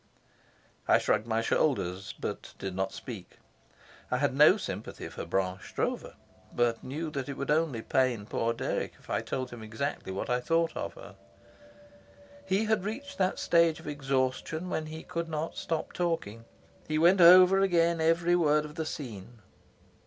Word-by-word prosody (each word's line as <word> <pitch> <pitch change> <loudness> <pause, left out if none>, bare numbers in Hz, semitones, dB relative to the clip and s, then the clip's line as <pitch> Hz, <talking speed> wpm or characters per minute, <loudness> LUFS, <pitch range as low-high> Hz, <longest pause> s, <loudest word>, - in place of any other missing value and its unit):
I - - +6
shrugged 110 - 0
my 115 0 0
shoulders, 95 - 0
but - - -5
did 95 -2 -5
not 95 0 -1
speak. - - -9 0.7
I - - +1
had - - +1
no - - +7
sympathy - - -6
for - - -7
Blanche 95 +2 -2
Stroeve, - - -2 0.4
but 120 -1 0
knew 155 +4 -4
that 140 -1 -4
it 140 - -5
would 140 - -2
only 150 -7 +1
pain 125 -5 +1
poor 115 +2 -1
Dirk 115 - -2
if - - -13
I - - +1
told 130 -1 -4
him 120 -2 -9
exactly 110 0 -4
what 95 - -4
I 125 0 +1
thought 165 +5 +1
of - - -4
her. - - -12 1.3
He 195 +3 +1
had 220 -3 +1
reached 280 +7 -6
that 185 0 +1
stage 170 -2 +3
of - - -14
exhaustion 145 +4 -2
when 155 - -2
he 160 +1 -8
could 170 -2 -4
not 155 +1 -3
stop 165 -2 -3
talking. 140 - -2 0.4
He 155 - 0
went 175 +4 +5
over 185 +2 +8
again 170 -3 +2
every 170 +2 +3
word 150 -3 +3
of 150 - -9
the 160 -1 -4
scene. 115 -5 -7
150 Hz, 165 wpm, -29 LUFS, 120-170 Hz, 1.3 s, over